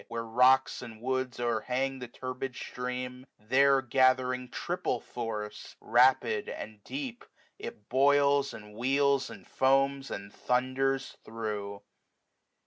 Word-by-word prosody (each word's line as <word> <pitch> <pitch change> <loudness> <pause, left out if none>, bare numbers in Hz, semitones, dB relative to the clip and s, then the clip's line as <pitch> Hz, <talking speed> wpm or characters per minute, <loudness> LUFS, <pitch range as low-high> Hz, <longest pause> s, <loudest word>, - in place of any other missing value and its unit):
Where 115 0 -4
rocks 125 +3 +4
and 115 -3 -9
woods 130 0 -2
o'crhang 125 +3 -1
the 125 - -6
turbid 130 +1 -5
stream; 125 +1 -5
There 135 +5 +3
gathering 130 0 +2
triple - - -2
force, 105 -3 -6
rapid, 120 -2 +3
and 105 -1 -8
deep, 270 -3 -5 0.4
104 435 - -6
It 470 - -10
boils, 140 +1 +4
and 105 -2 -11
wheels, 135 +4 +2
and - - -11
foams, 135 +1 +2
and 100 +1 -7
thunders 135 +2 0
through. 105 -3 -5
125 Hz, 120 wpm, -30 LUFS, 115-135 Hz, 0.4 s, rocks